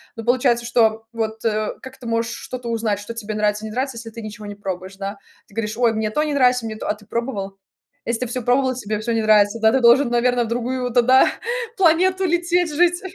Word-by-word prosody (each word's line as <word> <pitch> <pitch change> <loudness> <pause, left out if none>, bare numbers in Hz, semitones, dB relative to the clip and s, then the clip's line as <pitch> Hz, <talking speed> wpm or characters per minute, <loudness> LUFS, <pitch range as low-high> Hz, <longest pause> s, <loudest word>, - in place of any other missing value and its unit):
Но 225 - -7
получается, 245 -1 +2
что 225 -2 +2
вот, 220 -1 -3
э 215 -1 0
как 260 0 -11
ты 250 - -13
можешь 230 0 -1
что-то 250 -2 -7
узнать, 220 -3 -1
что 205 +3 -7
тебе 220 -1 -5
нравится, 210 0 0
не 215 - -6
нравится, 260 +1 -2
если 230 0 -7
ты 230 - -8
ничего 215 0 -8
не 205 - -7
пробуешь, 190 -1 -6
да. 200 +1 -5 0.3
Ты 200 - -20
говоришь: 215 -1 -2
"Ой, 235 -2 +3
мне 215 -1 -1
то 300 - 0
не 305 -1 -2
нравится, 250 -3 +3
мне 220 - -5
то" - - -6
А - - +2
ты 210 0 -19
пробовал? 205 -5 -4 0.5
Если 235 0 -2
ты 250 - -1
всё 250 +2 -3
пробовал, 260 +2 +2
и - - -9
тебе 215 -3 -3
всё 235 +2 -3
не 225 - +1
нравится, 215 0 +4
да, 220 0 +4
ты 265 - +2
должен, 240 +3 +6
наверно, 240 0 +2
в - - -6
другую 245 +2 -2
тогда 255 +2 +5 0.5
планету 370 +1 +3
лететь, 345 -1 +1
жить. 350 +3 +2
230 Hz, 235 wpm, -21 LUFS, 215-255 Hz, 0.5 s, должен